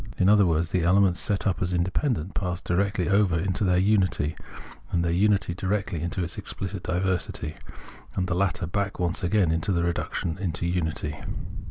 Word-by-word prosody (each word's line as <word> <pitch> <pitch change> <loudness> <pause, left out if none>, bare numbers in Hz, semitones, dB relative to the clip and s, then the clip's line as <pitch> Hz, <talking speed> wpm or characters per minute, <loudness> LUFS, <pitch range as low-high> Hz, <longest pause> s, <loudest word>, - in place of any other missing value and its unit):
In 95 - +4
otlier 105 -2 +6
words, 80 0 +1
the 90 - +2
elements 90 +1 +4
set 100 -1 0
up 95 -4 0
as 90 0 0
independent 95 - 0
pass 90 -2 -2
directly 95 0 0
over 100 -3 +3
into 95 +5 -1
their 90 -2 +3
unity, 95 -6 +2 0.5
and 85 -1 0
their 85 - +1
unity 100 0 +2
directly 95 -1 -2
into 85 +2 -2
its 85 - -5
exphcit 95 -1 -5
diversity, 90 -4 -2 0.6
and 90 - 0
the 90 - 0
latter 95 0 0
back 100 +3 -2
once 85 -1 0
again 90 -2 +2
into 80 +4 0
the 85 -2 +1
reduction 85 -1 -2 0.2
to 85 - -3
unity. 80 -4 -2
90 Hz, 175 wpm, -26 LUFS, 85-100 Hz, 0.6 s, otlier